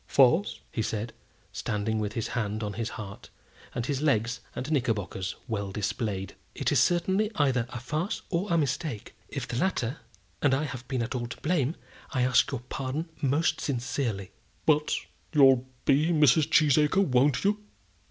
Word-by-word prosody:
"Farce!" 140 +9 +4 0.2
said 110 +1 -3
he, - - -34
standing 110 +1 -1
with 105 -1 -2
his 115 0 -2
hand 110 -2 -2
on 105 -1 -3
his 115 +2 -3
heart, 100 -2 -8 0.5
and 120 - -1
his 140 0 -1
legs 125 -4 +1 0.2
and 130 +5 -4
knickerbockers 105 - -1
well 100 -3 -2
displayed. 100 -1 -2 0.2
"It - - 0
is - - +4
certainly 190 +4 +2
either 130 -5 +2
a 120 - -5
farce 155 - -2
or 185 +3 0
a 170 - +4
mistake. 145 -5 -2 0.2
If - - -4
the 120 - -3
latter, 150 -6 0 0.4
and 140 -3 +4
I 140 - 0
have 125 -4 -6
been 130 -3 -1
at 115 - -4
all 120 -2 -2
to 115 +1 -8
blame, 155 -2 +1 0.4
I 130 -3 +2
ask 125 0 +4
your 135 -4 -3
pardon 135 +6 -4
most 150 +3 +1
sincerely." 120 -6 -2 0.3
"But 150 0 +3 0.4
you'll 135 -3 +6 0.2
be 145 +4 +4
Mrs. 150 -3 +4
Cheesacre; 155 +5 +4
won't 130 -1 +3
you?" 210 +1 +1
130 Hz, 165 wpm, -28 LUFS, 115-150 Hz, 0.5 s, you'll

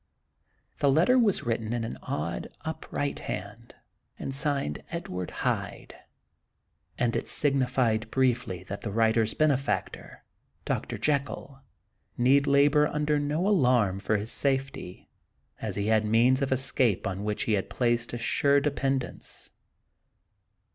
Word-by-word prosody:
The 140 - +4
letter 180 - +4
was 205 -10 +2
written 115 -2 -2
in 120 -1 -1
an 115 - -5
odd, 85 +3 -3 0.2
up 160 0 -6
right 145 0 -2
hand, 105 +5 -7 0.4
and 135 - -5
signed 140 - 0
"Edward 90 -1 -4 0.2
Hyde;" - - -2 1.0
and 120 -1 0
it - - -2
signified 125 -5 +1
briefly 120 -9 0
that 100 +2 -7
the 110 - -4
writer's 110 0 +2
benefactor, 145 -3 -1 0.4
Dr. - - -2
Jekyll, 140 -1 -2 0.6
need 135 +3 +4
labor 145 +1 +4
under 150 0 0
no 150 +6 0
alarm 125 - +3
for 110 +1 0
his 105 +3 -3
safety, 135 -9 -2 0.5
as - - -3
he 100 - -1
had 110 0 +3
means 120 +5 +3
of 135 - -1
escape 130 -5 +1
on 95 +1 -3
which 105 +5 -1
he 110 -6 +1
placed 120 +2 -1
a 120 - -3
sure 140 +4 +3
dependence. 135 -2 -2
125 Hz, 130 wpm, -28 LUFS, 110-140 Hz, 1.0 s, The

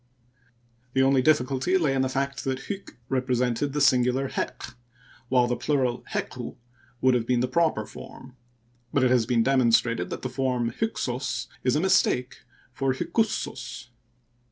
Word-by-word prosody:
The 135 - +3
only 135 0 +4
difficulty 135 +5 +2
lay 155 -7 +1
in 135 - +1
the 130 - +1
fact 135 +1 -2
that 130 0 -2
hyk 200 -1 -7
represented 125 +1 0
the 145 - -2
singular 130 0 +3
heq^ 120 - -4 0.6
while 125 -2 +4
the 125 0 0
plural 130 -5 0
hequ - - -4 0.5
would 130 0 +4
have 120 -2 0
been 125 -1 +2
the 125 - +1
proper 130 -5 +1
form; 130 -1 -12 0.6
but 135 - +2
it 125 - +3
has 120 -3 +3
been 120 -2 +3
demonstrated 115 -6 +2
that - - -6
the - - -1
form 125 -2 -1
Hyksos 135 - -2
is 125 +1 +2
a - - +2
mistake 135 -8 +2 0.4
for 130 +1 0
Hykussos. 130 - -2
130 Hz, 155 wpm, -26 LUFS, 125-135 Hz, 0.6 s, only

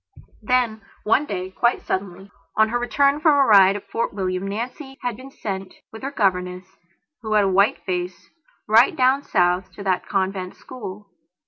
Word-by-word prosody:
Then 230 -1 +1 0.2
one 265 +7 +2
day, 185 -1 -4
quite 235 +5 0
suddenly, 190 0 -4 0.3
on 220 0 +4
her 240 +2 0
return 280 +4 +2
from 310 0 +4
a 275 - +5
ride 195 -3 +6
at 205 - -7
Fort 230 - -1
William, 185 -1 -2
Nancy 255 +6 -6
had 245 -2 -2
been 260 +4 -11
sent, 195 -7 -6 0.2
with 220 - -10
her 270 - -3
governess, 185 -7 -1 0.6
who 220 -2 -3
had 210 -1 +4
a - - +2
white 195 +3 +2
face, 180 -1 -4 0.4
right 225 +4 +5
down 260 +1 +3
South 180 -6 +1
to 200 - -9
that 185 -2 -1
convent 190 -1 -2
school. 205 -5 -10
205 Hz, 175 wpm, -22 LUFS, 190-245 Hz, 0.6 s, ride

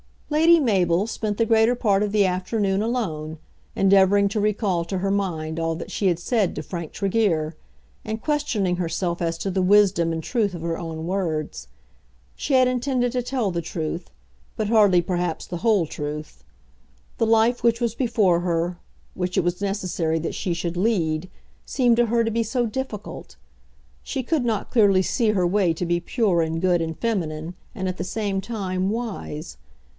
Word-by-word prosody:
Lady 325 +3 +6
Mabel 190 -6 +2
spent 215 -2 -3
the 230 - +2
greater 225 +2 +4
part 205 -5 +2
of 210 -1 -1
the 205 -2 +4
afternoon 195 +2 0
alone, 165 -10 -2 0.4
endeavouring 195 +1 +4
to 210 - -2
recall 205 -4 0
to 185 +2 -3
her 195 +1 0
mind 165 -5 -2
all 165 0 -1
that 165 - -7
she 200 - 0
had 175 -3 +2
said 205 +2 0
to 150 - -4
Frank 170 -1 -6
Tregear, 190 -7 0 0.5
and 220 +1 -4
questioning 235 - 0
herself 170 0 -2
as 165 -1 -1
to 195 - -3
the 190 +1 0
wisdom 185 -3 +4
and 160 0 -4
truth 210 -4 0
of 170 - -7
her 165 0 -2
own 160 -1 -5
words. 165 - -3 0.7
She 285 - -3
had 255 -1 +5
intended 250 0 0
to 250 0 -1
tell 245 -5 -1
the 170 -1 -2
truth, 165 +1 -4 0.5
but 215 -2 -2
hardly 205 -6 +5
perhaps 175 -2 -2
the 175 - -5
whole 210 -3 +2
truth. 150 - -6 0.8
The 225 - +2
life 225 +2 +3
which 235 0 +2
was 235 -2 0
before 220 -9 +2
her, 175 0 -1 0.3
which 180 0 -3
it - - +3
was 175 +2 -1
necessary 185 -5 -1
that 165 - -3
she 180 -4 -2
should 170 0 -3
lead, 180 -5 0 0.4
seemed 245 -3 +2
to 240 - +4
her 230 +1 +2
to 225 - -1
be 230 +1 0
so 240 +2 0
difficult! 225 -2 -6 0.7
She 265 - -4
could 285 -1 0
not 220 -4 -1
clearly 200 -6 +4
see 225 +3 +1
her 185 -4 +1
way 180 -1 +2
to 170 +2 -3
be 175 0 +1
pure 185 -1 +1
and 160 0 -1
good 180 -2 +2
and 160 0 -3
feminine, 170 -7 -2 0.2
and 190 -1 -2
at 185 - -5
the 175 - -3
same 200 0 -2
time 190 -3 -2
wise. 205 - -5
195 Hz, 180 wpm, -23 LUFS, 170-225 Hz, 0.8 s, Lady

